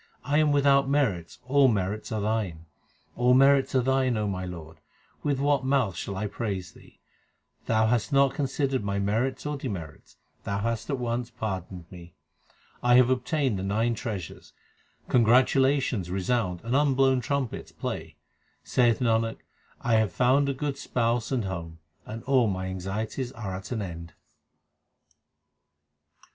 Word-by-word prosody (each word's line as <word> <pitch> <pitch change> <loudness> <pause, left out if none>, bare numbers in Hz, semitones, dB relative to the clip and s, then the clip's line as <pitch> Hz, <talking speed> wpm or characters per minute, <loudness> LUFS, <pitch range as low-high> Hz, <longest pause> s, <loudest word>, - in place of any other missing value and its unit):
1 145 +4 +2
am 155 -1 +3
without 140 -1 +4
merits; 105 - 0
all 135 +1 +4
merits 105 -2 -1
are 110 -1 -1
Thine; 100 -7 -2 0.5
All 125 +1 +4
merits 135 0 +4
are 130 - +3
Thine, 130 -2 +1
O 105 -1 -1
my 95 -2 -3
Lord; 80 -3 -9 0.4
with 140 -2 0
what 140 -1 +2
mouth 130 -8 +1
shall 100 +3 -5
I 105 - -2
praise 100 -5 -4
Thee? - - -19 0.7
Thou 110 -1 +3
hast 120 +3 +1
not 140 -1 +4
considered 135 -2 -1
my 100 0 -2
merits 110 +8 -1
or 150 0 -2
demerits; 95 - -7 0.3
Thou 100 - -2
hast 115 +4 -2
at 140 - 0
once 120 0 -2
pardoned 95 -6 -5
me. 85 -2 -12 0.7
I 120 0 +4
have 125 0 +6
obtained 130 -3 0
the - - -4
nine 110 +4 +1
treasures; 105 -6 -6 0.5
congratulations 125 -3 +3
resound 95 -1 -1
and 120 +3 -1
unblown 135 -2 +3
trumpets 135 -1 -3
play. - - -5 0.5
Saith 120 -1 +2
Nanak, 115 -1 +1 0.4
I 115 -2 +2
have 110 -2 +1
found 135 +3 +3
a - - 0
good 140 0 -3
Spouse 115 -1 -1
and 125 -6 0
home, 85 -3 -5 0.3
and 115 +1 -7
all 130 -4 +3
my 95 -2 -2
anxieties 100 +7 -4
are 110 -6 -5
at 95 +5 -8
an 110 -4 -2
end. 85 -2 -8
115 Hz, 150 wpm, -27 LUFS, 100-135 Hz, 0.7 s, have